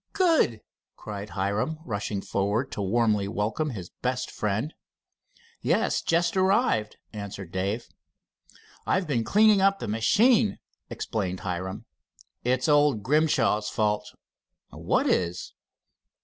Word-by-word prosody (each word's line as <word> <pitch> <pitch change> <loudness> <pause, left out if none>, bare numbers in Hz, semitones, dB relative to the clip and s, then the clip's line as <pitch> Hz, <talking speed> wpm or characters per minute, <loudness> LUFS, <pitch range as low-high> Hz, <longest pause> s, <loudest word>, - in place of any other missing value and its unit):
Good!" 325 - +2 0.3
cried 105 0 -7
Hiram, 100 +11 -1
rushing 100 -2 -3
forward 105 +6 -1
to - - -4
warmly 105 0 +1
welcome 110 +9 -1
his 95 -9 -7
best 125 0 -2
friend. 110 +9 -2 0.9
"Yes, - - +1
just 170 +2 +1
arrived," 190 - +2 0.2
answered 100 -4 -7
Dave. 100 +5 -2 1.0
"I've 185 -1 +1
been 130 -7 0
cleaning 210 - +4
up 195 0 +4
the - - -6
machine," 215 - +3 0.3
explained 95 -4 -3
Hiram. 95 +4 -4 0.6
"It's 130 +3 +1
old 145 -7 +3
Grimshaw's 130 -7 +2
fault." 105 -1 -1 0.6
"What - - 0
is?" 90 0 -1
110 Hz, 110 wpm, -26 LUFS, 100-155 Hz, 1.0 s, cleaning